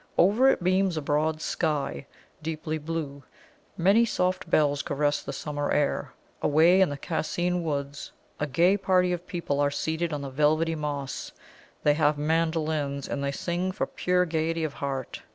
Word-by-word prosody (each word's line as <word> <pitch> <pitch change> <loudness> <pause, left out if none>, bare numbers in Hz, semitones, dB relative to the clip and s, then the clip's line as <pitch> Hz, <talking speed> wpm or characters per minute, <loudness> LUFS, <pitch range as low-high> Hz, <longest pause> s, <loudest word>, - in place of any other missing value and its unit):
Over 210 +9 +5
it 225 - +1
beams 185 -1 +2
a - - -1
broad 155 +2 0
sky, 145 - -1 0.3
deeply 155 0 -3
blue; 150 -2 -4 0.6
many 195 +7 +5
soft 185 -6 -1
bells 145 -3 +3
caress 145 0 0
the - - -6
summer 145 -1 -3
air. 145 -1 0 0.3
Away 165 +5 +5
in 190 - +4
the 145 - -4
Cascine 175 +5 -1
Woods 140 -2 -4 0.3
a 150 - -1
gay 170 +8 +3
party 185 -2 +2
of 175 0 -5
people 170 -6 -2
are 145 0 +3
seated 160 +3 -2
on 145 -1 -3
the 140 - -4
velvety 155 +4 +2
moss; 145 -3 -4 0.5
they 150 - +5
have 150 -1 +2
mandolins, 155 -2 0
and 140 - -3
they 140 - 0
sing 175 +5 -2
for - - -2
pure 180 0 +1
gaiety 165 0 -1
of 155 -2 -2
heart. 135 -2 -4
155 Hz, 165 wpm, -27 LUFS, 145-175 Hz, 0.6 s, Over